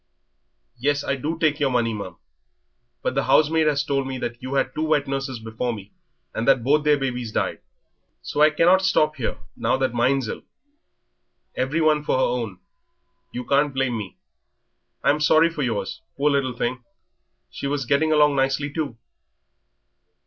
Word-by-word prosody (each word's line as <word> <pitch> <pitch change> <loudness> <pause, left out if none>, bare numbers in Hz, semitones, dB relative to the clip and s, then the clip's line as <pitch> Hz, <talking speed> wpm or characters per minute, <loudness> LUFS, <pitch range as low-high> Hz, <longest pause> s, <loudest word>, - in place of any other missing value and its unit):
"Yes, 145 +3 +1
I 140 - 0
do 150 +5 -3
take 155 -2 +1
your 140 -2 +2
money, 120 -3 +1
ma'am. 95 -5 -7 0.9
But - - 0
the - - 0
housemaid 155 +1 +4
has 145 -1 +2
told 135 -2 -1
me 135 -1 -4
that 120 -1 -5
you 130 +2 -4
had - - +1
two 155 - -3
wet 155 -2 +2
nurses 135 -1 -3
before 115 +2 -3
me, 105 -2 -10 0.4
and 115 - -3
that 135 -4 +4
both 145 +4 +3
their 150 -1 +4
babies 125 -4 -3
died, - - -1 0.6
so 150 - -2
I 155 - +8
cannot 175 +5 +4
stop 155 -5 +2
here 125 - -3 0.2
now - - 0
that 130 -2 0
mine's 125 +1 +1
ill. - - -5 1.1
Everyone 150 +3 +1
for 150 - +1
her 130 - +2
own; 115 -7 -3 0.7
you 125 0 -5
can't 140 0 +2
blame 135 -2 0
me. 105 -4 -6 0.9
I'm 150 - +3
sorry 160 +2 +4
for 155 - -5
yours 115 -6 -2 0.2
poor 145 +1 +2
little 135 -3 0
thing, 125 +1 -2 0.7
she 140 - -5
was 140 -2 -2
getting 150 +4 +2
on 150 -2 +4
nicely 135 +2 0
too." 145 -7 -3
135 Hz, 170 wpm, -23 LUFS, 125-150 Hz, 1.1 s, I